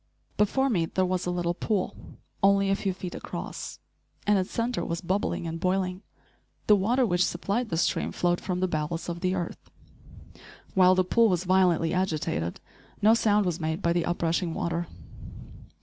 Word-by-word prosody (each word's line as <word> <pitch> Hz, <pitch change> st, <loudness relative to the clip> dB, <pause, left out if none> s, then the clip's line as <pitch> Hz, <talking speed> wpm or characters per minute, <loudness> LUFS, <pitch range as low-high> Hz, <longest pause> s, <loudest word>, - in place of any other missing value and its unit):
Before 265 Hz, +6 st, +2 dB
me 175 Hz, -10 st, +1 dB
there 185 Hz, +2 st, 0 dB
was 180 Hz, -1 st, -1 dB
a -, -, +1 dB
little 175 Hz, -1 st, 0 dB
pool, 195 Hz, +1 st, -1 dB, 0.5 s
only 195 Hz, 0 st, +4 dB
a -, -, +3 dB
few 195 Hz, -1 st, -1 dB
feet 180 Hz, -1 st, -6 dB
across, -, -, -6 dB, 0.5 s
and 205 Hz, -1 st, +4 dB
its 185 Hz, -, -2 dB
centre 230 Hz, -6 st, -1 dB
was 170 Hz, 0 st, -3 dB
bubbling 185 Hz, 0 st, -1 dB
and 165 Hz, 0 st, -4 dB
boiling. 185 Hz, +1 st, 0 dB, 0.6 s
The 210 Hz, -, +6 dB
water 235 Hz, +6 st, +2 dB
which 180 Hz, -4 st, +2 dB
supplied 200 Hz, +8 st, -1 dB
the 165 Hz, -, -1 dB
stream 170 Hz, -, 0 dB
flowed 175 Hz, 0 st, 0 dB
from 180 Hz, -1 st, -2 dB
the 185 Hz, -, +2 dB
bowels 165 Hz, +1 st, -3 dB
of 170 Hz, 0 st, -4 dB
the 185 Hz, +1 st, 0 dB
earth. 175 Hz, -2 st, -5 dB, 1.0 s
While 185 Hz, -1 st, +6 dB
the 185 Hz, -, +3 dB
pool 230 Hz, +5 st, +3 dB
was 180 Hz, -2 st, +1 dB
violently 180 Hz, -3 st, +3 dB
agitated, 155 Hz, -, -1 dB, 0.4 s
no 215 Hz, +2 st, +5 dB
sound 210 Hz, -3 st, +3 dB
was 175 Hz, -1 st, -1 dB
made 160 Hz, +3 st, -2 dB
by 170 Hz, -, +3 dB
the 175 Hz, -1 st, 0 dB
up 175 Hz, 0 st, -2 dB
rushing 165 Hz, 0 st, 0 dB
water. 170 Hz, 0 st, -2 dB
185 Hz, 180 wpm, -27 LUFS, 170-195 Hz, 1.0 s, The